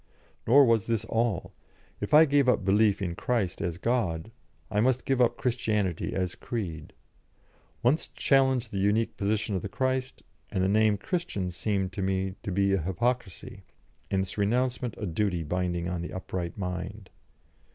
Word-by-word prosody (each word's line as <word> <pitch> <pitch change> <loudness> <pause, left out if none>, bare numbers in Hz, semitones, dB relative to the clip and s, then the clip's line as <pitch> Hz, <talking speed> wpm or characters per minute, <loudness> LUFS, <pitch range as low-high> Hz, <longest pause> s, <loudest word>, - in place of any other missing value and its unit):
Nor 140 +4 +7
was 115 -4 +2
this 115 -2 0
all. 115 -1 -1 0.5
If - - -4
I 155 +2 +8
gave 140 -3 +3
up 105 - +2
belief 100 0 +3
in 85 -2 -2
Christ 100 -1 -1
as 85 -1 -2
God, 110 -4 -1 0.4
I 105 - +1
must 130 +1 +1
give 135 -2 +1
up 120 - +3
Christianity 105 -8 -1
as 90 -2 -1
creed. 85 -10 -5 0.9
Once 130 +7 +2
challenge 130 -3 +2
the 100 - -3
unique 105 +3 +1
position 105 +1 -1
of 95 - -1
the 100 - -5
Christ, 130 +3 -2 0.3
and 95 - -1
the - - +3
name 105 +1 +3
Christian 100 - -3
seemed 95 0 -1
to 95 - -4
me 95 0 -1
to 100 - -4
be 100 +1 +2
a 95 - +1
hypocrisy, 95 +4 -2 0.5
and 95 -1 +1
its 95 +2 -5
renouncement 120 +2 0
a 105 - -4
duty 90 -1 -1
binding 90 +1 -1
on 90 -1 -3
the 85 - -6
upright 90 -2 -4
mind. 90 -2 -5
105 Hz, 165 wpm, -28 LUFS, 95-120 Hz, 0.9 s, I